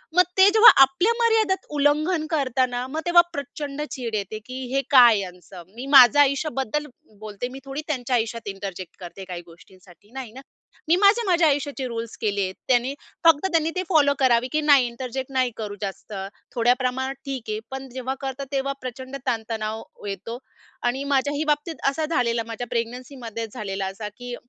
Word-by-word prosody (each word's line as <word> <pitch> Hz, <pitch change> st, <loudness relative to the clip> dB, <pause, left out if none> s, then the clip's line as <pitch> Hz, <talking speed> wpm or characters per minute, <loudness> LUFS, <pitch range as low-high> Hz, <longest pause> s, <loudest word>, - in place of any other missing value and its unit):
मग 360 Hz, -, +7 dB
ते 385 Hz, +1 st, +8 dB
जेव्हा 445 Hz, +1 st, +10 dB
आपल्या 270 Hz, -, +4 dB
मर्यादेत 445 Hz, -5 st, +2 dB
उल्लंघन 305 Hz, +3 st, +2 dB
करता 265 Hz, -5 st, +1 dB
ना, 245 Hz, 0 st, -4 dB
मग 310 Hz, +4 st, -4 dB
तेव्हा 345 Hz, 0 st, +7 dB
प्रचंड 285 Hz, +1 st, -5 dB
चीड 235 Hz, -4 st, -4 dB
येते. 210 Hz, +1 st, -4 dB
की 255 Hz, +1 st, -6 dB
हे 275 Hz, -, +2 dB
काय 240 Hz, -5 st, +7 dB
यांचं? 180 Hz, -1 st, -9 dB
मी 250 Hz, +3 st, -7 dB
माझं 260 Hz, +1 st, +9 dB
आयुष्याबद्दल 280 Hz, -1 st, +1 dB, 0.3 s
बोलते, 215 Hz, +2 st, -5 dB
मी 265 Hz, -, -9 dB
थोडी 275 Hz, +2 st, -5 dB
त्यांच्या 255 Hz, -4 st, -1 dB
आयुष्यात 230 Hz, -1 st, -2 dB
इंटरजेक्ट 195 Hz, -3 st, -7 dB
करते 185 Hz, +2 st, -9 dB
काही 180 Hz, -2 st, -6 dB
गोष्टींसाठी 180 Hz, +3 st, -19 dB
नाही 260 Hz, -4 st, -7 dB
ना? 260 Hz, +4 st, -11 dB, 0.5 s
मी 330 Hz, -, +5 dB
माझे 410 Hz, +5 st, +4 dB
माझ्या 345 Hz, -3 st, +4 dB
आयुष्याचे 285 Hz, -2 st, -1 dB
रुल्स 230 Hz, -1 st, -5 dB
केलेत. 200 Hz, -3 st, -1 dB
त्यांनी 255 Hz, +1 st, +2 dB, 0.3 s
फक्त 330 Hz, 0 st, +5 dB
त्यांनी 325 Hz, -1 st, +2 dB
ते 370 Hz, -, -1 dB
फॉलो 295 Hz, -5 st, +4 dB
करावे 250 Hz, -2 st, +3 dB
की 310 Hz, 0 st, +1 dB
नाही 285 Hz, -4 st, +5 dB
इंटरजेक्ट 255 Hz, +2 st, -6 dB
नाही 255 Hz, -2 st, +1 dB
करू 210 Hz, -2 st, -5 dB
जास्त. 200 Hz, +1 st, -6 dB, 0.4 s
थोड्या 240 Hz, +1 st, +4 dB
प्रमाणात 260 Hz, +1 st, -1 dB
ठीक 260 Hz, -5 st, -5 dB
आहे, 215 Hz, -, -2 dB
पण 265 Hz, 0 st, -6 dB
जेव्हा 260 Hz, +1 st, -4 dB
करता 270 Hz, 0 st, -4 dB
तेव्हा 275 Hz, 0 st, -1 dB
प्रचंड 260 Hz, +1 st, -7 dB
ताणतणाव 220 Hz, -2 st, -3 dB, 0.2 s
येतो. 200 Hz, +4 st, -5 dB, 0.5 s
आणि 245 Hz, +3 st, 0 dB
माझ्याही 285 Hz, +2 st, +1 dB
बाबतीत 300 Hz, +2 st, -3 dB
असा 310 Hz, +3 st, -2 dB
झालेला. 240 Hz, -7 st, 0 dB
माझ्या 230 Hz, +2 st, -5 dB
प्रेग्नन्सीमध्ये 235 Hz, -1 st, -4 dB
झालेला 195 Hz, -4 st, -4 dB
असा 200 Hz, +2 st, -5 dB
की 245 Hz, 0 st, -6 dB
255 Hz, 170 wpm, -24 LUFS, 225-285 Hz, 0.5 s, जेव्हा